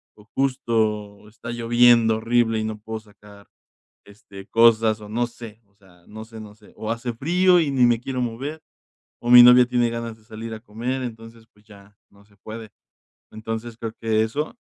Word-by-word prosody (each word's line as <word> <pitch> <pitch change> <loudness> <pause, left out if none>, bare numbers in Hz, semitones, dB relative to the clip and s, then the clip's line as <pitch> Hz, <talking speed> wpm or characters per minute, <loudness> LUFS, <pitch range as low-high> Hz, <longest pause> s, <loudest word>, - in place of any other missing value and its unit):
o 105 - -19
justo 110 -6 -2
está 115 +2 -9
lloviendo 120 -1 +3
horrible 115 0 +1
y - - -2
no 110 0 -4
puedo 110 +1 -7
sacar, 105 -1 -18 0.6
este, 100 -1 -14
cosas 115 -1 +3
o 105 - -11
no 120 +3 -1
sé, 115 -2 -12
o 100 - -37
sea, 90 -4 -24
no 110 +1 -9
sé, 110 0 -12
no 105 -1 -12
sé. 105 - -21
O 110 - -5
hace 115 +1 -3
frío 180 +8 +3
y 150 - -1
ni 130 -3 +3
me 120 -1 +2
quiero 130 +1 -4
mover, 130 +6 -5 0.6
o 120 - -6
mi 125 0 +10
novia 125 0 +7
tiene 120 -1 0
ganas 115 -1 -6
de 110 - -26
salir 110 0 -9
a 110 - -10
comer, 120 +4 -5
entonces, 115 -1 -9
pues 105 0 -27
ya, 100 -1 -18 0.2
no 100 0 -22
se 100 -1 -28
puede. 110 +1 -10 0.6
Entonces, 110 +1 -6
creo 115 -1 -6
que 110 -1 +1
eso, 145 - -3
115 Hz, 190 wpm, -22 LUFS, 110-120 Hz, 0.6 s, mi